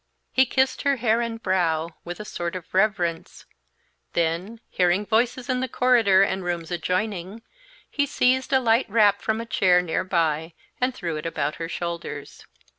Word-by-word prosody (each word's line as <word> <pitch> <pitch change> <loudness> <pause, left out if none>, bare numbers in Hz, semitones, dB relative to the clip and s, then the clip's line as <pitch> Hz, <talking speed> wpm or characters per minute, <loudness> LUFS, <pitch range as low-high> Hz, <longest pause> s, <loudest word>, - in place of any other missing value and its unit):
He 260 0 +4
kissed 260 +1 +1
her 280 -1 +2
hair 230 -2 +1
and 230 -1 -3
brow, 170 -5 0
with 175 +2 -7
a 210 - -6
sort 175 -3 -4
of 180 -3 -8
reverence; 185 -4 0 0.7
then, 170 +7 -1
hearing 180 +3 +2
voices 240 +3 0
in 255 -2 0
the 260 - -1
corridor 230 -6 +4
and 190 -1 -1
rooms 175 -1 -3
adjoining, 185 +4 -2 0.4
he 285 -1 -1
seized 260 -1 +1
a 265 - +5
light 230 -1 +2
wrap 205 -2 +4
from 220 0 -1
a 230 - -4
chair 185 -5 +3
near 180 +1 -1
by 165 -3 -1 0.3
and 250 0 +1
threw 165 -3 -3
it 155 - -4
about 150 -2 -2
her 165 0 -5
shoulders. 170 -4 -6
195 Hz, 170 wpm, -24 LUFS, 170-230 Hz, 0.7 s, a